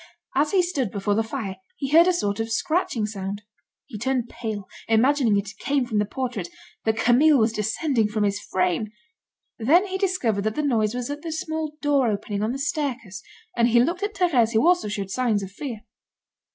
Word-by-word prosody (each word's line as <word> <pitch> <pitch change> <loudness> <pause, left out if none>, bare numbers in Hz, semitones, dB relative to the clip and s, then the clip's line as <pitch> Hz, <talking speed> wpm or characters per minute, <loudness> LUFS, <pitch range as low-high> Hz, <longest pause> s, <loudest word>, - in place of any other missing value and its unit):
As 290 +3 +3
he 375 0 +3
stood 285 - -1
before 205 +1 -1
the 220 - +2
fire, 220 -4 -4 0.2
he 275 - -3
heard 330 +4 +6
a - - +5
sort 205 - -1
of 225 0 -2
scratching 285 - 0
sound. 200 -1 -5 0.4
He 220 -7 -8
turned 250 0 -1
pale, 215 -4 -5 0.2
imagining 230 -1 +3
it 200 0 -4
came 280 -2 0
from 220 -4 -1
the 210 - +2
portrait, 235 -8 -4 0.4
that 220 0 +1
Camille 260 +6 +5
was 220 -2 +2
descending 225 +2 0
from 210 0 -1
his 205 0 0
frame. 185 +2 -1 0.7
Then 320 - +4
he 380 -1 -4
discovered 350 - 0
that 215 0 -1
the 300 - -1
noise 225 -5 +1
was 250 +2 -3
at 290 +1 -5
the 330 0 -5
small 315 -1 -3
door 280 -4 +3
opening 205 -1 -3
on 215 +2 0
the 265 - -3
staircase, 265 - -3 0.3
and 235 0 +3
he 240 0 +4
looked 340 +10 +1
at 410 0 -2
Thérèse 260 - +2
who 225 +5 +3
also 355 -6 +3
showed 200 -2 -4
signs 225 -4 +1
of 190 - -7
fear. 230 0 -6
235 Hz, 200 wpm, -24 LUFS, 210-290 Hz, 0.7 s, heard